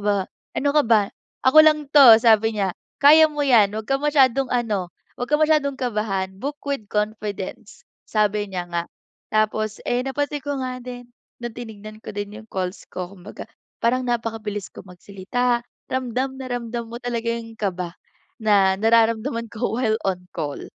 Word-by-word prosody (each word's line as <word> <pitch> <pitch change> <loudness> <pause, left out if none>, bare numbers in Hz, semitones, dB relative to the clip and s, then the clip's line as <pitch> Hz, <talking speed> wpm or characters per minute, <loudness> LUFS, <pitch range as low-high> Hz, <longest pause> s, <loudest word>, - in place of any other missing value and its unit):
ba 205 -1 +2 0.4
ano 285 - +1
ka 300 - +6
ba, 220 -2 +4 0.4
ako 260 +4 +6
lang 305 -2 +3
'to", 265 -7 +10
sabi 225 -1 +4
niya, 190 -2 0 0.3
"Kaya 310 +3 +8
mo 295 - -4
yan, 225 -7 +5
huwag 220 0 -6
kang 275 +2 0
masyadong 270 -3 +3
ano, 210 -7 -1 0.2
huwag 245 - -4
kang 300 - +4
masyadong 300 -3 +2
kabahan, 210 -6 -1
book 285 +8 -5
with 275 -7 -2
confidence", 210 0 -4 0.2
sabi 210 -1 +1
niya 175 -1 -4
nga. 170 0 -2 0.5
Tapos, 215 0 0
eh, 245 +1 +1
napansin 290 +2 -2
ko 285 -2 -2
nga 255 0 -3
din, 245 0 -9 0.3
no'ng 240 -2 -6
tinignan 215 -2 -9
ko - - -6
din 205 +1 -5
yung 220 - -21
calls 185 0 -3
ko, 180 +1 -5
kumbaga, 185 +3 -10 0.3
parang 250 +2 +1
napakabilis 225 -4 -3
ko - - -11
magsalita, 205 +7 -2 0.3
ramdam 260 +1 -2
na 260 - -6
ramdam 235 -1 -4
mo 235 - -7
talaga 235 -2 -3
yung 230 -1 -6
kaba 180 -4 -3 0.5
na 200 -3 +4
nararamdaman 230 +2 +2
ko, 230 0 -2
while 220 -3 +1
on 180 -1 -3
call. 150 -4 -4
225 Hz, 165 wpm, -22 LUFS, 205-255 Hz, 0.5 s, to